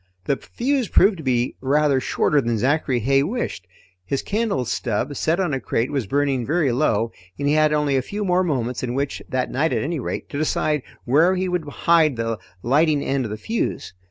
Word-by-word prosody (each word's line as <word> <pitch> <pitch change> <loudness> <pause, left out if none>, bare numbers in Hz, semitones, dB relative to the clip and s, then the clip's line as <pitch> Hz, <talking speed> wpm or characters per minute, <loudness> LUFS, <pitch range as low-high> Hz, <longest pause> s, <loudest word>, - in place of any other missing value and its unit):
The 140 - +1
fuse 255 - -1
proved 195 +1 +4
to 160 - -8
be 125 -2 0
rather 140 0 +2
shorter 145 +2 +1
than 115 -2 -1
Zachary 130 +1 +1
Heigh 135 +4 +3
wished. 155 - -3 0.4
His 135 +9 -2
candle 205 - -1
stub, 120 +4 -2
set 165 +6 0
on 175 -6 0
a 135 - 0
crate, 120 +2 -1
was 135 -7 -2
burning 140 0 +1
very 150 +1 +1
low 115 -4 +1 0.3
and 145 - -1
he 145 - +3
had 155 0 +4
only 150 -2 +1
a 130 - +2
few 205 +10 -4
more 180 0 +2
moments 125 -7 -1
in 125 -1 -3
which 140 +1 -2
that 130 -1 -1
night 145 +1 +1
at 115 - 0
any 160 +1 -2
rate - - -4
to 140 - -4
decide 155 -1 0 0.2
where 160 +9 +4
he 185 0 -1
would 180 -4 -2
hide 160 -2 +3
the 115 -1 -2 0.2
lighting 145 +3 +3
end 135 -2 0
of - - -4
the 105 - -4
fuse. 220 - -3
140 Hz, 210 wpm, -22 LUFS, 125-160 Hz, 0.4 s, proved